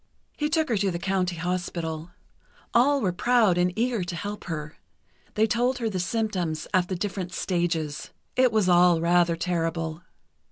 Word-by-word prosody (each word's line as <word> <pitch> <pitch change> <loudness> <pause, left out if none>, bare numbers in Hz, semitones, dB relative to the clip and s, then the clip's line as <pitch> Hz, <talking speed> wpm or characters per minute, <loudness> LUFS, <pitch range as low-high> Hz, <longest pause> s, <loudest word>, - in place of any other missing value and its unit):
He 300 0 -1
took 315 0 +1
her 230 - +1
to 200 0 +1
the 170 - -2
County 185 0 -1
Hospital. 170 -2 -3 0.6
All 275 +4 +4
were 190 -5 +1
proud 225 -2 +3
and 180 0 +2
eager 235 -3 0
to 175 0 -5
help 205 +4 -5
her. 155 -2 -5 0.6
They 215 - +4
told 240 +3 +1
her 230 -3 -2
the 185 - -2
symptoms 180 -5 -2
at 180 -1 +3
the 185 - -2
different 185 -1 -4
stages. 170 -5 -2 0.3
It 255 -1 +4
was 215 -4 +2
all 175 -1 +5
rather 170 0 +3
terrible. 165 -1 -2
180 Hz, 165 wpm, -26 LUFS, 170-220 Hz, 0.6 s, all